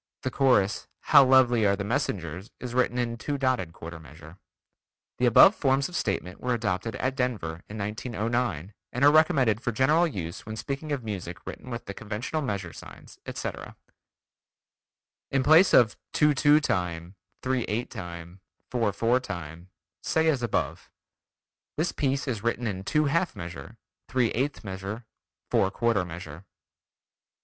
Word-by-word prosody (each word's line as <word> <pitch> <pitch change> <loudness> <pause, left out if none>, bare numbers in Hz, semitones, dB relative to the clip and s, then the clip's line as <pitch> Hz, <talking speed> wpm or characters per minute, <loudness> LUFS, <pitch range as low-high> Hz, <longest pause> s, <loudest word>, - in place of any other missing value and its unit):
The 130 - -1
chorus: 125 -8 +2
"How - - +7
lovely 130 -3 +5
are 100 -1 +3
the 100 - -4
Messengers" 95 -3 -3
is 125 -1 -6
written 125 -1 +1
in 120 -1 -1
two 145 +4 -2
dotted 130 - 0
quarter 80 0 -9
measure. 80 +3 -14 0.8
The 125 - +3
above 120 - +8
forms 135 -6 +1
of 180 - -9
statement 95 - -2
were 125 -1 0
adopted 110 -1 -2
at 130 0 -1
Denver 105 -11 -2
in 105 - -7
1909, 105 - -2 0.2
and 125 +3 +2
are 145 - +8
recommended 140 - +3
for 120 - -1
general 150 +9 +3
use 85 - -6
when 110 - -6
speaking 140 +6 -5
of 140 -4 -2
music 95 -6 -6
written - - -8
with 120 -1 -5
the 100 - -6
conventional 110 +10 -4
measure 100 - -3
signs, - - -13
etc. - - -6 1.5
In 135 -1 +1
place 160 +7 +6
of: 110 -3 +5 0.2
"two 150 -1 +4
two 145 +2 +5
time, 90 - -2 0.3
three 130 -1 0
eight 115 +4 -3
time, 85 -3 -8 0.3
four 115 -4 +1
four 115 +5 +2
time," 85 -7 -8 0.3
say 160 0 +1
as 140 -5 +1
above: 120 - -2 0.9
"This 160 +4 0
piece 140 0 -1
is 115 -6 -2
written 120 +2 -1
in 95 -4 -3
two 150 +9 +1
half 170 +5 0
measure, 85 0 -8 0.3
three 125 -4 +1
eighth 135 +3 -2
measure, 100 +3 -6 0.5
four 95 - +3
quarter 115 -1 +1
measure." 85 -1 -8
115 Hz, 155 wpm, -27 LUFS, 95-130 Hz, 1.5 s, above